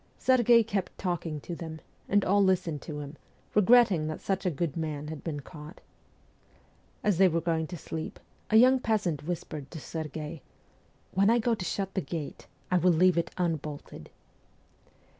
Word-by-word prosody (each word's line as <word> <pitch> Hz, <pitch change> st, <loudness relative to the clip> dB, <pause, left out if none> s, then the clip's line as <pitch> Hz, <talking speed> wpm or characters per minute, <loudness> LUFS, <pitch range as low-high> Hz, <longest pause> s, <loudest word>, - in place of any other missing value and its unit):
Serghei 240 Hz, -2 st, +5 dB
kept 200 Hz, -4 st, -3 dB
talking 170 Hz, -4 st, -2 dB
to 170 Hz, -, -6 dB
them, 160 Hz, -1 st, -7 dB, 0.3 s
and 205 Hz, 0 st, +3 dB
all 200 Hz, +2 st, +4 dB
listened 180 Hz, -6 st, +1 dB
to 150 Hz, 0 st, -6 dB
him, 145 Hz, +1 st, -9 dB, 0.4 s
regretting 210 Hz, -6 st, +5 dB
that 155 Hz, -, -4 dB
such 195 Hz, -1 st, -1 dB
a -, -, +4 dB
good 155 Hz, -1 st, -2 dB
man 150 Hz, -2 st, -3 dB
had 155 Hz, -2 st, -7 dB
been 150 Hz, -4 st, -4 dB
caught. 150 Hz, +3 st, -11 dB, 1.2 s
As 200 Hz, -4 st, +2 dB
they 190 Hz, -, +7 dB
were 170 Hz, -1 st, +1 dB
going 165 Hz, -1 st, -1 dB
to 175 Hz, -, -7 dB
sleep, 160 Hz, +1 st, -6 dB, 0.3 s
a 215 Hz, -, +2 dB
young 255 Hz, +3 st, +6 dB
peasant 205 Hz, -, 0 dB
whispered 155 Hz, -5 st, -5 dB
to 165 Hz, -, -8 dB
Serghei, 155 Hz, 0 st, -6 dB, 0.7 s
'When 195 Hz, +2 st, +4 dB
I 235 Hz, -, +5 dB
go 235 Hz, 0 st, +1 dB
to 210 Hz, -, -3 dB
shut 195 Hz, 0 st, -2 dB
the 190 Hz, -, 0 dB
gate 160 Hz, -4 st, -6 dB, 0.2 s
I 180 Hz, -, +4 dB
will 180 Hz, +2 st, +4 dB
leave 180 Hz, +2 st, +4 dB
it 170 Hz, -, 0 dB
unbolted.' 155 Hz, -5 st, -4 dB
170 Hz, 170 wpm, -29 LUFS, 155-195 Hz, 1.2 s, they